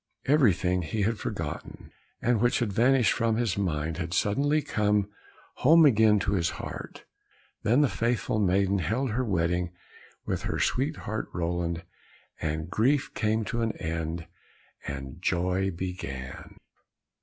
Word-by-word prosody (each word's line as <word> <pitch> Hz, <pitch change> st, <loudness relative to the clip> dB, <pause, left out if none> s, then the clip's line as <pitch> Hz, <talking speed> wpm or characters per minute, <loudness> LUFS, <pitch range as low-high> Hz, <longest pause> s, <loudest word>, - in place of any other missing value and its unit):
Everything 100 Hz, -, +3 dB
he 100 Hz, +6 st, -2 dB
had 110 Hz, +2 st, 0 dB
forgotten, -, -, -5 dB, 0.3 s
and 120 Hz, -2 st, +2 dB
which 120 Hz, 0 st, +3 dB
had 110 Hz, -5 st, -1 dB
vanished 125 Hz, 0 st, +4 dB
from 115 Hz, -1 st, +1 dB
his 115 Hz, -4 st, 0 dB
mind, 80 Hz, -5 st, -1 dB
had 85 Hz, -1 st, -3 dB
suddenly 145 Hz, +9 st, +2 dB
come 105 Hz, -7 st, +1 dB, 0.5 s
home 160 Hz, +4 st, +6 dB
again 110 Hz, -5 st, +5 dB
to 100 Hz, 0 st, 0 dB
his 85 Hz, -5 st, +1 dB
heart. -, -, -7 dB, 0.6 s
Then 120 Hz, +7 st, +3 dB
the 145 Hz, -, +5 dB
faithful 115 Hz, -2 st, 0 dB
maiden 100 Hz, 0 st, +2 dB
held 115 Hz, -, -1 dB
her 125 Hz, +4 st, 0 dB
wedding 90 Hz, -4 st, 0 dB, 0.5 s
with -, -, -2 dB
her -, -, -2 dB
sweetheart 130 Hz, -5 st, -1 dB
Roland, 85 Hz, -1 st, -2 dB, 0.6 s
and 80 Hz, 0 st, -2 dB
grief 130 Hz, -, +1 dB
came 110 Hz, 0 st, 0 dB
to 120 Hz, -, -2 dB
an 115 Hz, -1 st, 0 dB
end 80 Hz, 0 st, -4 dB, 0.6 s
and 70 Hz, +3 st, -6 dB
joy 90 Hz, +1 st, +1 dB
began. 85 Hz, -8 st, -6 dB
100 Hz, 135 wpm, -28 LUFS, 85-115 Hz, 0.6 s, home